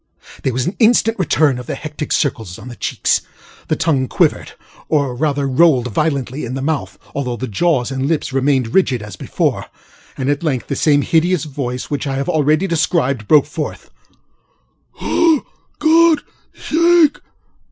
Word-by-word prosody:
ŌĆØ - - -21
There 130 - -1
was 125 +1 -1
an 180 - -3
instant 225 -1 +3
return 150 -6 +2
of 125 - -9
the - - -3
hectic 150 0 -6
circles 110 -10 -1
on 125 - -10
the 120 - -9
cheeks; - - 0 0.5
the - - +1
tongue 140 -6 0
quivered, - - 0 0.4
or 140 -5 +1
rather 140 0 0
rolled 130 -3 +3
violently 140 -1 -1
in 125 +2 -4
the 135 - -3
mouth 155 0 -2 0.2
(although 130 -3 -2
the 130 - -4
jaws 130 - 0
and 135 0 -2
lips 155 -4 -1
remained 135 -3 +1
rigid 130 - +2
as 105 - -9
before), - - -2 0.5
and 130 - -2
at 145 0 0
length 140 -7 -1
the 140 - -1
same 145 0 +3
hideous 170 0 +1
voice 130 -4 -5
which 145 0 -2
I 135 - -2
have 140 +1 -2
already 155 +3 +2
described, 150 - 0
broke 150 -3 +5
forth: 150 0 -6 1.1
ŌĆ£For 325 -4 +2 0.3
GodŌĆÖs 325 0 +5 0.4
sake! 315 - -4 0.4
ŌĆöquick! - - -36
145 Hz, 170 wpm, -18 LUFS, 130-160 Hz, 1.1 s, broke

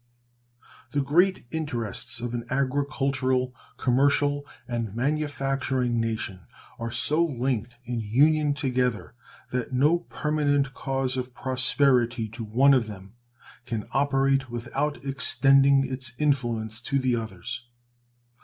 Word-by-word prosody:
The 145 - +2
great 175 +6 +2
interests 120 -6 -2
of 120 0 -4
an 120 -1 -3
agricultural, 135 -1 0 0.2
commercial, 145 +2 +2 0.2
and 115 -4 -3
manufacturing 135 -3 -1
nation 110 -6 -4 0.3
are 115 0 -3
so 150 +7 +2
linked 125 -5 -2
in 120 0 -3
union 145 +7 +3
together 125 -5 -1 0.4
that 125 0 -3
no 150 +7 +3
permanent 145 -4 0
cause 135 -1 -2
of 125 -1 -5
prosperity 125 -3 +2
to 115 +2 -7
one 130 +6 +4
of 125 -5 +2
them 100 -1 -10 0.5
can 115 -4 -3
operate 135 -1 +2
without 135 +5 -3
extending 135 0 +4
its 130 -1 -5
influence 120 -6 -1
to 135 +3 -1
the 130 -2 +1
others. 115 +2 -5
130 Hz, 115 wpm, -26 LUFS, 120-140 Hz, 0.5 s, one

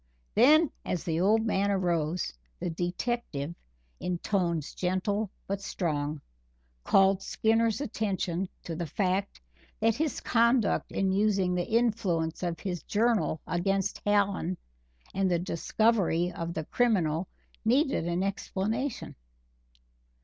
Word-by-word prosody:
Then, 300 +7 +6
as 180 - -2
the 165 -1 -1
old 220 +5 +3
man 200 -2 +1
rose, 170 -2 0 0.3
the 175 - -2
detective, 175 - -2 0.5
in 180 -1 -2
tones 170 -5 -1
gentle 190 +3 -1 0.2
but 200 0 -3
strong, 150 -6 -2 0.6
called 195 0 +4
Skinner's 225 +3 +1
attention 195 -7 -2
to 165 - -5
the 170 0 -3
fact 190 +4 -1 0.4
that 225 +1 +3
his 305 +4 -1
conduct 235 -1 +2
in 190 -1 +1
using 195 -2 +2
the 175 -1 -1
influence 215 -9 +1
of 175 -2 -2
his 180 -3 -3
journal 215 -6 +1
against 195 +2 0
Hallen 200 -3 +1 0.6
and 195 -1 +1
the 175 - +2
discovery 180 0 +1
of 170 0 -5
the 160 -1 -3
criminal 180 -9 +1 0.4
needed 255 - +2
an 175 +2 0
explanation. 210 +6 -2
190 Hz, 120 wpm, -29 LUFS, 175-220 Hz, 0.6 s, Then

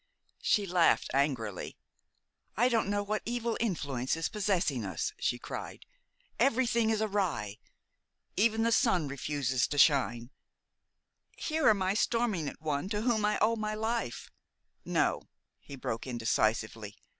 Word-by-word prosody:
She 205 - +2
laughed 175 -2 +3
angrily. 130 - -1 0.8
"I 245 +3 +4
don't 225 -5 +1
know 205 0 0
what 210 +1 -2
evil 235 0 -2
influence 145 - -1
is 165 - -1
possessing 185 - 0
us," 95 -5 -3
she 125 - 0
cried. - - -7 0.5
"Everything 235 -3 +2
is 220 -1 +1
awry. 175 - -1 0.8
Even 225 +2 +2
the 230 - +2
sun 205 - +3
refuses 135 -2 -1
to 145 - -4
shine. 130 -4 +3 1.1
Here 315 -4 +2
am 200 -3 +3
I 185 +1 +1
storming 215 -8 0
at - - -14
one 150 +3 -1
to 210 0 -2
whom 230 -3 +1
I 210 0 +2
owe 225 +1 +3
my 215 -1 -3
life 220 - -3 0.3
" - - -47
"No," - - +1 0.3
he 140 - -10
broke 115 -2 -4
in 125 -2 -4
decisively. 110 -2 0
190 Hz, 145 wpm, -30 LUFS, 130-220 Hz, 1.1 s, I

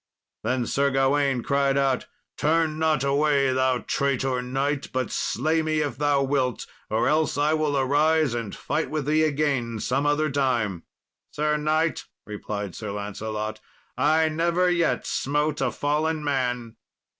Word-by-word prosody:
Then 130 -1 -1
Sir 140 +4 +1
Gawain 135 -1 +1
cried 140 -1 +1
out, 135 -2 +1 0.3
"Turn 155 0 +1
not 155 -4 +2
away, 140 -1 +2
thou 130 -1 +1
traitor 135 -2 0
knight, 135 +3 -2
but 130 -2 -2
slay 155 +7 0
me 155 -1 0
if 145 -4 -3
thou 145 -1 +2
wilt, 130 -3 0 0.2
or 110 +1 +1
else 155 +1 +1
I 150 +2 +2
will 155 -2 0
arise 145 +1 +2
and 115 -4 -4
fight 160 - -2
with 150 -2 -2
thee 155 +2 +2
again 140 -7 0
some 135 +6 0
other 150 +1 +1
time." 120 -10 0 0.4
"Sir 150 0 0
knight," 155 +2 0 0.2
replied 105 -2 -5
Sir 110 - -6
Lancelot, 105 +1 -4 0.4
"I 160 +2 +3
never 170 +3 +1
yet 170 -1 +1
smote 150 +2 -1
a - - +2
fallen 155 +2 -1
man." 125 -5 -2
140 Hz, 145 wpm, -25 LUFS, 125-155 Hz, 0.4 s, I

